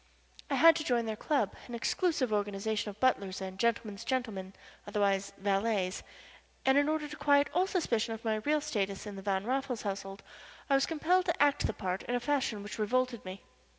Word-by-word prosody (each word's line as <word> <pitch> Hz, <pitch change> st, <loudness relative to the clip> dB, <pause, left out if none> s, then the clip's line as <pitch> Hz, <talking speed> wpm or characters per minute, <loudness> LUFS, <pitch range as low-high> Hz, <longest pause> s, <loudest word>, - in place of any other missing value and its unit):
I -, -, +1 dB
had 330 Hz, -1 st, +7 dB
to 310 Hz, -, -2 dB
join 240 Hz, -5 st, +1 dB
their 220 Hz, -1 st, -2 dB
club 265 Hz, -3 st, 0 dB
an 240 Hz, -, -6 dB
exclusive 265 Hz, -, 0 dB
organization 205 Hz, +1 st, -1 dB
of 205 Hz, 0 st, -10 dB
butlers 200 Hz, -7 st, +1 dB
and 190 Hz, 0 st, -6 dB
"gentlemen's 225 Hz, -3 st, 0 dB
gentlemen" 215 Hz, -8 st, -2 dB, 0.3 s
otherwise 200 Hz, -1 st, +1 dB
valets 195 Hz, -1 st, 0 dB, 0.6 s
and 265 Hz, -, +5 dB
in 285 Hz, +1 st, +4 dB
order 310 Hz, -1 st, -1 dB
to 300 Hz, -, -8 dB
quiet 285 Hz, -1 st, +3 dB
all 360 Hz, +3 st, +2 dB
suspicion 235 Hz, -, 0 dB
of 225 Hz, -, -13 dB
my 220 Hz, -1 st, +1 dB
real 295 Hz, +7 st, +1 dB
status 200 Hz, -10 st, -2 dB
in 205 Hz, -1 st, -6 dB
the 195 Hz, -, -7 dB
Van 195 Hz, 0 st, -1 dB
Raffles 260 Hz, -1 st, -1 dB
household 195 Hz, -1 st, -5 dB, 0.5 s
I -, -, +6 dB
was 275 Hz, 0 st, +3 dB
compelled 345 Hz, +3 st, +2 dB
to 340 Hz, -, -1 dB
act 285 Hz, -1 st, +3 dB
the -, -, -2 dB
part 185 Hz, -1 st, -3 dB
in 245 Hz, -, -2 dB
a -, -, +1 dB
fashion 245 Hz, -5 st, -1 dB
which 205 Hz, +2 st, -7 dB
revolted 250 Hz, +2 st, 0 dB
me. 185 Hz, +1 st, -8 dB
225 Hz, 195 wpm, -31 LUFS, 200-280 Hz, 0.6 s, had